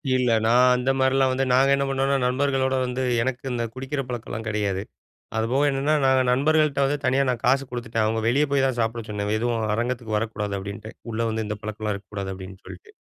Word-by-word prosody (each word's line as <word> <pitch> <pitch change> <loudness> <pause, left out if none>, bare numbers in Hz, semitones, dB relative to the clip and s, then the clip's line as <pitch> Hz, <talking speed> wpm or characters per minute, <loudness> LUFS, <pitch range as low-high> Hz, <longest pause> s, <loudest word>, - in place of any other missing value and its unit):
இல்ல. 125 -2 +2
நான் 125 +2 +5
அந்தமாரிலாம் 130 +1 +2
வந்து 135 +1 0
நாங்க 135 +2 +4
என்ன 140 0 0
பண்ணுவோன்னா, 135 +1 +1
நண்பர்களோடு 130 0 +1
வந்து 125 +1 -2 0.2
எனக்கு 125 +1 -2
இந்த 120 -1 -1
குடிக்கிற 135 +2 -3
பழக்கம்லாம் 115 -2 -5
கிடையாது. 100 -3 -1 0.6
அதுபோக 120 +6 +1
என்னன்னா, 140 +3 +1
நாங்க 130 0 +4
நண்பர்கள்ட்ட 150 +2 +2
வந்து 145 +2 0
தனியா 135 +2 +3
நான் 120 -2 -1
காசு 135 +2 +3
குடுத்துட்டேன். 120 -2 -2
அவுங்க 110 +1 0
வெளிய 140 +6 +3
போய் 135 -1 +3
தான் 130 -2 -1
சாப்பிட 115 0 -1
சொன்னேன். 105 0 -2
எதுவும் 115 0 -1
அரங்கத்துக்கு 120 -1 -2
வரக்கூடாது 105 -2 -3
அப்பிடின்டேன். 100 +3 -7 0.2
உள்ள 115 +1 -2
வந்து 110 0 -2
இந்த 105 0 -4
பழக்கம்லாம் 110 0 -3
இருக்கக்கூடாது 100 -1 -6
அப்பிடின்னு 95 0 -10
சொல்லிட்டு. 95 -1 -12
125 Hz, 185 wpm, -24 LUFS, 110-135 Hz, 0.6 s, நான்